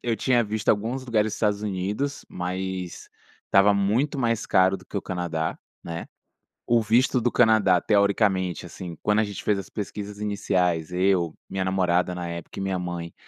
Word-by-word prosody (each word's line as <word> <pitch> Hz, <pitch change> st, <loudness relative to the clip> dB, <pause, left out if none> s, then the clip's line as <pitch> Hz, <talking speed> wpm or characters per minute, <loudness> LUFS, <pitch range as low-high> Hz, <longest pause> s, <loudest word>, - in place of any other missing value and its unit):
Eu 115 Hz, -2 st, 0 dB
tinha 120 Hz, +1 st, +2 dB
visto 105 Hz, 0 st, -4 dB
alguns 115 Hz, +5 st, +1 dB
lugares 110 Hz, -3 st, +1 dB
dos -, -, -2 dB
Estados 105 Hz, -1 st, 0 dB
Unidos, 105 Hz, +8 st, -2 dB
mas 90 Hz, 0 st, -4 dB, 0.4 s
estava 100 Hz, +1 st, +5 dB
muito 115 Hz, +9 st, +1 dB
mais 115 Hz, -3 st, 0 dB
caro 95 Hz, +1 st, +4 dB
do 90 Hz, -, -16 dB
que -, -, -7 dB
o 100 Hz, -, -1 dB
Canadá, 85 Hz, -3 st, -3 dB, 0.3 s
né, 85 Hz, 0 st, -5 dB, 0.6 s
o 120 Hz, -1 st, +4 dB
visto 125 Hz, +4 st, +3 dB
do 120 Hz, -, +1 dB
Canadá 110 Hz, -6 st, +4 dB
teoricamente 100 Hz, -3 st, +2 dB
assim, 85 Hz, -1 st, -8 dB
quando 105 Hz, 0 st, +3 dB
a 110 Hz, -, +4 dB
gente 100 Hz, -2 st, -6 dB
fez 105 Hz, -2 st, +1 dB
as 95 Hz, -, -8 dB
pesquisas 105 Hz, 0 st, -6 dB
iniciais 90 Hz, -5 st, 0 dB
eu, 90 Hz, -3 st, +2 dB, 0.2 s
minha 95 Hz, -1 st, -2 dB
namorada 90 Hz, -1 st, +1 dB
na 90 Hz, -1 st, -4 dB
época 85 Hz, +2 st, -7 dB
e -, -, -3 dB
minha 95 Hz, -1 st, -1 dB
mãe, 85 Hz, -1 st, -5 dB
100 Hz, 175 wpm, -25 LUFS, 90-110 Hz, 0.6 s, estava